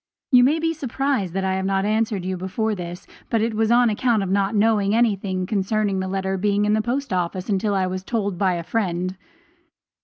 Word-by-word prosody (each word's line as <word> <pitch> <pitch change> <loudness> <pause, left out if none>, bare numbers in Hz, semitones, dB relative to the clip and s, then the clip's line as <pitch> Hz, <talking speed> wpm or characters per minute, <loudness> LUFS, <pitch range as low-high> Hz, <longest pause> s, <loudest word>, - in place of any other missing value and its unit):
You 250 -2 +7
may 290 +5 +3
be 325 0 0
surprised 270 - -2
that 195 - 0
I 190 0 0
have 190 0 -2
not 195 0 +1
answered 215 -3 0
you 185 0 -2
before 190 +5 -2
this, 175 -2 -7 0.2
but 230 - +1
it 225 +1 0
was 220 0 +1
on 240 +1 +5
account 225 -1 +1
of 190 - -3
not 200 +2 +1
knowing 210 -1 +2
anything 195 -5 +1
concerning 200 0 0
the 190 - -2
letter 190 0 -2
being 205 +1 +1
in 210 - +2
the 215 - +2
post 255 +2 -2
office 180 +2 -2
until 205 +1 +1
I 190 -1 +1
was 185 0 -4
told 205 -2 -1
so - - -9
by 190 -2 +2
a 170 - -4
friend. 185 -2 -2
200 Hz, 220 wpm, -22 LUFS, 190-225 Hz, 0.2 s, You